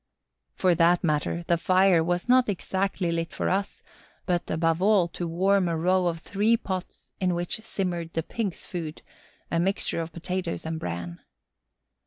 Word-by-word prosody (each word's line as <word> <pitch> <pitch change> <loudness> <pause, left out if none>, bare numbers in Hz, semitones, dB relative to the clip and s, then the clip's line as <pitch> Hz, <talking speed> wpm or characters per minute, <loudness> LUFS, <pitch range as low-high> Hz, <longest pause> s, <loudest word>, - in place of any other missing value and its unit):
For 185 -1 +3
that 170 +1 +3
matter, 155 +1 0
the 170 -1 +2
fire 185 -2 +4
was 175 +4 -1
not 250 -1 +5
exactly 190 -2 -1
lit 165 0 -2
for - - -1
us, 195 +2 -2 0.4
but, 175 -2 -1
above 165 +1 +1
all, 200 -3 +4
to 175 +1 -4
warm 190 +3 +2
a 165 -1 0
row 180 +2 +2
of 165 -1 -2
three 210 +5 +2
pots 185 -4 -6
in 180 -2 +1
which 175 +5 -3
simmered 175 -6 -3
the 165 - -1
Pigs' 205 0 -4
food, 165 -3 -6 0.5
a 165 - +1
mixture 190 -1 0
of 165 0 -6
potatoes 175 +1 -3
and 160 0 -3
bran. 85 - -5
175 Hz, 165 wpm, -26 LUFS, 165-190 Hz, 0.5 s, not